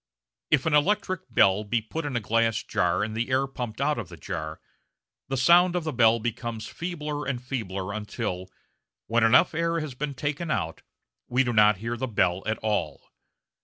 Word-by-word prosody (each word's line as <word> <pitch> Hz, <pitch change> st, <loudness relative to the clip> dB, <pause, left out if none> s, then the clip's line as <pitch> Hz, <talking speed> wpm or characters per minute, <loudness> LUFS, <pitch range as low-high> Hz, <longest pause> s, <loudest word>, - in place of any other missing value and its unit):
If 150 Hz, -, +3 dB
an 160 Hz, -, +1 dB
electric 185 Hz, -, +1 dB
bell 100 Hz, -2 st, +4 dB
be 115 Hz, +3 st, 0 dB
put 150 Hz, +9 st, -5 dB
in 140 Hz, -3 st, -3 dB
a -, -, +2 dB
glass 115 Hz, 0 st, +1 dB
jar 90 Hz, +3 st, +1 dB
and 110 Hz, +1 st, -4 dB
the 115 Hz, +3 st, -1 dB
air 130 Hz, +1 st, +2 dB
be 135 Hz, -, -14 dB
pumped 120 Hz, -2 st, -5 dB
out 140 Hz, -2 st, +1 dB
of 100 Hz, -8 st, -6 dB
the -, -, -11 dB
jar, 75 Hz, -1 st, -5 dB, 0.7 s
the 135 Hz, -, -2 dB
sound 175 Hz, +7 st, +5 dB
of 175 Hz, -, 0 dB
the 155 Hz, -1 st, -3 dB
bell 115 Hz, -1 st, +5 dB
becomes 115 Hz, 0 st, -4 dB
feebler 150 Hz, -4 st, -4 dB
and 130 Hz, -3 st, -1 dB
feebler 100 Hz, -7 st, -4 dB
until, 95 Hz, -3 st, -4 dB, 0.6 s
when 115 Hz, 0 st, +2 dB
enough 115 Hz, +2 st, +5 dB
air 165 Hz, +1 st, 0 dB
has 155 Hz, -4 st, -5 dB
been 140 Hz, +2 st, -4 dB
taken 150 Hz, +4 st, -3 dB
out, 95 Hz, -, -2 dB, 0.5 s
we 125 Hz, +2 st, +2 dB
do 120 Hz, -2 st, -1 dB
not 105 Hz, -2 st, +5 dB
hear 115 Hz, +4 st, -4 dB
the 130 Hz, +2 st, -2 dB
bell 95 Hz, -5 st, +1 dB
at 110 Hz, -, 0 dB
all. 95 Hz, -9 st, -2 dB
120 Hz, 195 wpm, -26 LUFS, 105-145 Hz, 0.7 s, sound